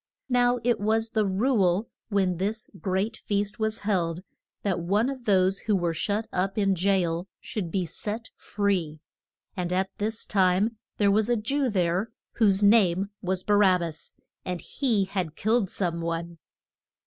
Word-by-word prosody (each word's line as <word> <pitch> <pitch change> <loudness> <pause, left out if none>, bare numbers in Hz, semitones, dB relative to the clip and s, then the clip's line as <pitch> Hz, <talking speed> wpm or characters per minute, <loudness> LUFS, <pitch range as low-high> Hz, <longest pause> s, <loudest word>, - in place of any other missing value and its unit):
Now 245 -1 +3
it 240 0 +2
was 220 +2 +1
the 215 -2 +1
rule 195 -1 +2 0.2
when 190 -4 +1
this 210 +5 -3
great 195 +4 -1
feast 205 0 -2
was 220 0 0
held, 180 -4 -1 0.4
that 190 -4 0
one 205 +9 +1
of 260 -3 -9
those 190 -1 +3
who 210 -2 0
were 175 -3 0
shut 205 +6 -1
up 195 +2 -1
in 200 -2 +3
jail 180 -2 +1
should 195 -6 -4
be 185 +1 -1
set 215 +6 -6
free. 185 -7 -1 0.6
And 180 -2 -3
at 190 +1 0
this 215 +2 -1
time 195 +3 +2 0.2
there 200 -1 +3
was 215 +2 +2
a 240 - +3
Jew 265 +5 0
there, 185 +1 0 0.2
whose 205 -3 +3
name 200 -2 +4
was 185 0 -1
Ba 205 - +2
rab 190 -3 +5
bas; 165 -2 -6 0.3
and 180 -1 -3
he 225 -5 0
had 185 -5 -3
killed 220 -2 +1
some 170 -4 -2
one. 170 0 -4
200 Hz, 160 wpm, -26 LUFS, 180-220 Hz, 0.6 s, rab